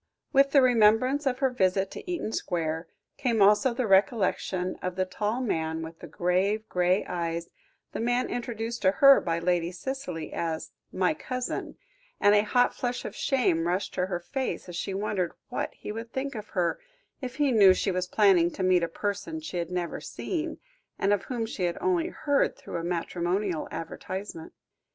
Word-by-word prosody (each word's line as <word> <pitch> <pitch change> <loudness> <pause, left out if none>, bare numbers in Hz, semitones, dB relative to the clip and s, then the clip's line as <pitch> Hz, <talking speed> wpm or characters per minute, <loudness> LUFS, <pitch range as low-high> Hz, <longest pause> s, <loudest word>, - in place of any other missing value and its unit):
With 275 0 +5
the 275 -1 +5
remembrance 250 +4 +4
of 250 -1 +1
her 260 - +2
visit 190 -4 +1
to 360 - -7
Eaton 335 -11 -2
Square, 165 -4 -2 0.3
came 235 -4 0
also 210 +6 +5
the 245 +1 -1
recollection 190 -2 +2
of 180 -1 -3
the 185 0 +1
tall 210 +6 -2
man 160 -8 -1
with 160 0 -9
the 170 - -9
grave 185 +7 0
grey 180 +2 +2
eyes, 170 -1 -3 0.4
the - - -5
man 245 +2 +1
introduced 235 -1 -4
to 190 -1 +4
her 275 +4 +7
by 165 -1 -1
Lady 170 0 0
Cicely, 225 - -5
as 160 -1 -3 0.2
"my 185 -3 +1
cousin," 255 +9 -4 0.4
and 205 - +5
a 205 - +6
hot 245 +4 +2
flush 245 0 -3
of - - -6
shame 175 -12 +1
rushed 185 +3 -1
to 180 0 0
her 180 -2 -2
face, 260 +8 -4
as 175 - -7
she 190 +2 -3
wondered 195 -3 -1 0.2
what - - -2
he - - -7
would 225 +2 -6
think 275 +1 -3
of 215 -2 -7
her, 175 - +1 0.4
if 255 -1 -5
he 290 -1 +2
knew 205 -5 +7
she 190 +1 +1
was 180 0 -1
planning 185 -4 +4
to 190 - -3
meet 185 -1 +4
a 170 - 0
person 205 - -3
she 310 - -6
had 170 -1 -2
never 180 -1 -3
seen, 325 -2 -4 0.4
and 200 +1 +2
of 200 - -1
whom 240 -3 -2
she 200 -4 -3
had 175 - -1
only 360 -3 +1
heard 290 -5 0
through 275 - -6
a 165 - -4
matrimonial 175 +1 -1
advertisement. 165 +1 -6
200 Hz, 185 wpm, -28 LUFS, 175-245 Hz, 0.4 s, her